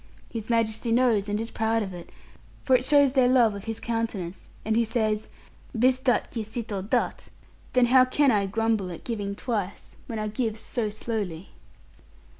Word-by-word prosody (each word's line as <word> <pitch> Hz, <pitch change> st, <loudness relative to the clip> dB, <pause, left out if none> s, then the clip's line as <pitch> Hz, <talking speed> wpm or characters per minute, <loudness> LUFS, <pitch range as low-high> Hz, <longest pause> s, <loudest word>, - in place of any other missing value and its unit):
His 225 Hz, -2 st, -6 dB
Majesty 230 Hz, 0 st, +1 dB
knows 230 Hz, -4 st, +3 dB
and 205 Hz, +1 st, -1 dB
is 225 Hz, +1 st, -4 dB
proud 225 Hz, 0 st, 0 dB
of 190 Hz, -2 st, -6 dB
it, 175 Hz, -1 st, -9 dB, 0.5 s
for 260 Hz, -, +4 dB
it 250 Hz, -, +2 dB
shows 285 Hz, -1 st, +4 dB
their 260 Hz, -3 st, +4 dB
love 245 Hz, -4 st, +4 dB
of 200 Hz, 0 st, -8 dB
his 225 Hz, -1 st, -3 dB
countenance; 225 Hz, -6 st, -3 dB, 0.2 s
and 220 Hz, 0 st, +1 dB
he 235 Hz, -, +4 dB
says, 220 Hz, -2 st, -1 dB, 0.5 s
"bis 255 Hz, +2 st, +3 dB
dat 260 Hz, -2 st, +1 dB
qui 230 Hz, -3 st, -3 dB
cito 215 Hz, -2 st, -4 dB
dat," 200 Hz, -, -1 dB, 0.4 s
then 250 Hz, -1 st, +5 dB
how 255 Hz, +1 st, +6 dB
can 275 Hz, +1 st, +3 dB
I 200 Hz, -3 st, +2 dB
grumble 220 Hz, -2 st, 0 dB
at 170 Hz, -, -8 dB
giving 205 Hz, -4 st, -3 dB
twice, 205 Hz, -5 st, -4 dB
when 225 Hz, -, -4 dB
I 215 Hz, 0 st, -2 dB
give 220 Hz, 0 st, -2 dB
so 225 Hz, -1 st, -2 dB
slowly?' 205 Hz, -5 st, -4 dB
225 Hz, 180 wpm, -26 LUFS, 210-245 Hz, 0.5 s, how